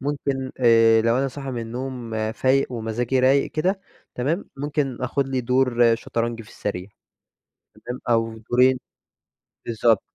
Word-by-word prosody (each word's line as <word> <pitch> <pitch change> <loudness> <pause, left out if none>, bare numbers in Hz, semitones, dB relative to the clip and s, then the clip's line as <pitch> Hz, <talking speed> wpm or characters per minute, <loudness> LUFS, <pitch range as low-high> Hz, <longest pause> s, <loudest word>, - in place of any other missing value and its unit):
ممكن 135 -1 -2
آآ 115 -2 +6
لو 115 +2 +2
أنا 135 +1 +1
صاحي 135 0 -6
من 120 -2 -3
النوم 120 0 -6 0.2
فايق 130 +2 +1
ومزاجي 120 +2 -1
رايق 135 +2 +3
كده 185 +5 0 0.3
تمام، 150 +10 -1
ممكن 145 -1 -2
آخد 135 +2 -1
لي 130 -1 -1
دور 120 -1 +3
شطرنج 115 0 -3
في 110 - -17
السريع 95 -2 -5 1.0
تمام، 125 +1 -5
أو 115 -1 +1
دورين 125 +4 +3 0.9
بالضبط. 115 -2 +2
125 Hz, 135 wpm, -23 LUFS, 115-135 Hz, 1.0 s, آآ